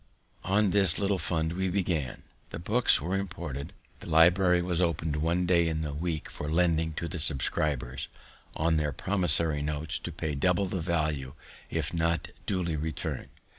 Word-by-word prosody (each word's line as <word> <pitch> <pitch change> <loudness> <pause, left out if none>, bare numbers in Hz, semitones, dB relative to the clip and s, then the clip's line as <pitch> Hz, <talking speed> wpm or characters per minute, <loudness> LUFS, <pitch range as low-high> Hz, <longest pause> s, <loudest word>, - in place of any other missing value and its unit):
On 100 +1 +2
this 95 -4 +5
little 100 -2 0
fund 80 -1 -1
we 95 +1 -1
began. 85 -8 -2 0.3
The - - -6
books 110 +9 +3
were 85 +6 -2
imported; 85 -8 -5 0.3
the - - -9
library 90 +2 +4
was 90 -1 0
opened 80 -3 0
one 85 +4 0
day 85 -2 +3
in 80 -1 -2
the 75 -2 -3
week 80 +1 -3
for 75 - -6
lending 80 -1 +1
to 85 - -4
the 85 0 -4
subscribers, 70 -3 +1 0.5
on 80 0 +1
their 75 -2 -1
promissory 85 -4 +1
notes 75 +2 -2
to 85 - -6
pay 80 -1 -4
double 90 +7 +1
the 95 -1 -3
value 75 -5 -2 0.3
if - - -2
not 85 0 0 0.2
duly 90 -5 -1
returned. 75 0 -4
85 Hz, 165 wpm, -28 LUFS, 75-90 Hz, 0.5 s, this